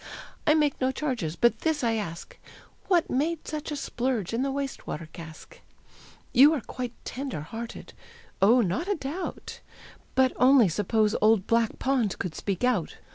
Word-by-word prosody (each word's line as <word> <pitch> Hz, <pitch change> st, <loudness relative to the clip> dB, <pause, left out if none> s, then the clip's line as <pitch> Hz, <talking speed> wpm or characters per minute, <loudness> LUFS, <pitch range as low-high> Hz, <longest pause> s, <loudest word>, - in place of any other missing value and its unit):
I 305 Hz, -, +6 dB
make 295 Hz, -3 st, +1 dB
no 260 Hz, 0 st, +2 dB
charges, 245 Hz, -, -3 dB
but 235 Hz, +5 st, +2 dB
this 315 Hz, -4 st, 0 dB
I 230 Hz, -1 st, +2 dB
ask, 175 Hz, -7 st, -5 dB, 0.5 s
What 355 Hz, -4 st, +2 dB
made 310 Hz, +5 st, -1 dB
such 305 Hz, 0 st, -4 dB
a -, -, -2 dB
splurge 245 Hz, -7 st, -2 dB
in 235 Hz, -, 0 dB
the 275 Hz, -, 0 dB
waste 275 Hz, 0 st, -4 dB
water 155 Hz, +1 st, -5 dB
cask? 160 Hz, -2 st, -11 dB, 0.7 s
You 285 Hz, +5 st, +7 dB
are 280 Hz, -, -3 dB
quite 245 Hz, +1 st, -6 dB
tender 265 Hz, -, -4 dB
hearted. 225 Hz, +9 st, -8 dB, 0.5 s
Oh, 230 Hz, +6 st, +6 dB
not 200 Hz, -, -1 dB
a 405 Hz, -, +1 dB
doubt! 305 Hz, +5 st, -6 dB, 0.6 s
But 260 Hz, -1 st, +4 dB
only 255 Hz, -5 st, +6 dB
suppose 210 Hz, +4 st, +1 dB
old 215 Hz, -2 st, +4 dB
Black 230 Hz, -1 st, +1 dB
Pond 255 Hz, -6 st, 0 dB
could 180 Hz, -4 st, -4 dB
speak 195 Hz, +3 st, -3 dB
out. 235 Hz, -10 st, +1 dB
245 Hz, 165 wpm, -27 LUFS, 210-280 Hz, 0.7 s, You